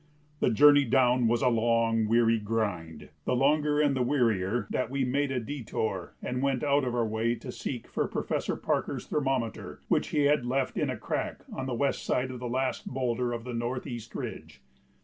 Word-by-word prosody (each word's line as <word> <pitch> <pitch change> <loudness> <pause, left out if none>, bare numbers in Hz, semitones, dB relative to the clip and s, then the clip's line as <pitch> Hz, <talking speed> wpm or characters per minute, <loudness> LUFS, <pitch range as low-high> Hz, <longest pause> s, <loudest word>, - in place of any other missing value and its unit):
The - - +3
journey 145 +5 +7
down 125 -1 +3
was 120 +1 +1
a - - +4
long, 115 -1 +2
weary 115 0 +3
grind, 100 -8 -3 0.2
the 125 - +1
longer 145 +3 +2
and 145 -2 +3
the 130 - 0
wearier 115 -5 +1
that 125 - -1
we 135 0 0
made 140 +2 0
a 130 - 0
détour 110 -7 -4
and 125 +1 -2
went 135 -1 0
out 145 -1 +3
of 125 -1 -1
our 120 -1 +1
way 110 +2 0
to - - -8
seek - - -5
for - - -1
Professor - - -2
Parker's - - -2
thermometer, 130 -6 -2
which - - +2
he 150 - 0
had 145 -2 +3
left 130 +2 -1
"in - - 0
a - - -3
crack - - -3
on 130 0 -4
the 125 - -2
west 140 +3 0
side 130 +1 0
of 125 - -7
the 125 0 -4
last 130 +1 -1
boulder 125 -1 -1
of 115 -1 -4
the 125 0 -6
northeast 120 0 -4
ridge." 75 -5 -7
125 Hz, 195 wpm, -29 LUFS, 115-135 Hz, 0.2 s, journey